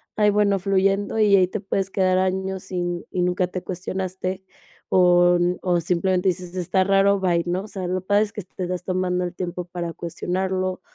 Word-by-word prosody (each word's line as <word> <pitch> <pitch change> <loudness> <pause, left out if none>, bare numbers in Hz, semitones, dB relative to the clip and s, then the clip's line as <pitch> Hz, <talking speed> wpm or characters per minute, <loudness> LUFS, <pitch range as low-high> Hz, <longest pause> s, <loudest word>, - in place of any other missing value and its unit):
ay 210 -1 +4
bueno, 200 -1 +2
fluyendo 195 +2 +1
y 210 -2 +5
ahí 185 -1 +4
te 215 +3 -4
puedes 195 0 -2
quedar 185 -1 +2
años 190 0 -1
sin 175 -2 -3
y 180 - -2
nunca 180 0 +1
te 180 0 -6
cuestionaste. 185 +1 -4 0.5
O 175 -1 +5
n 175 +1 +1
o 175 -2 +2
simplemente 180 +2 +1
dices: 180 0 -4
"Está 185 +1 +1
raro, 195 +1 +3
bye, 175 -3 +2
¿no?", 180 +2 -1
o 215 - -9
sea, 190 -3 -5
lo 185 0 -1
padre 205 +2 +2
es 205 - -5
que 210 - -6
te 185 - -12
estás 180 0 -3
tomando 180 -1 -1
el 175 - -4
tiempo 180 -1 -4
para 175 -1 -5
cuestionarlo, 185 +2 -2
185 Hz, 195 wpm, -23 LUFS, 180-190 Hz, 0.5 s, y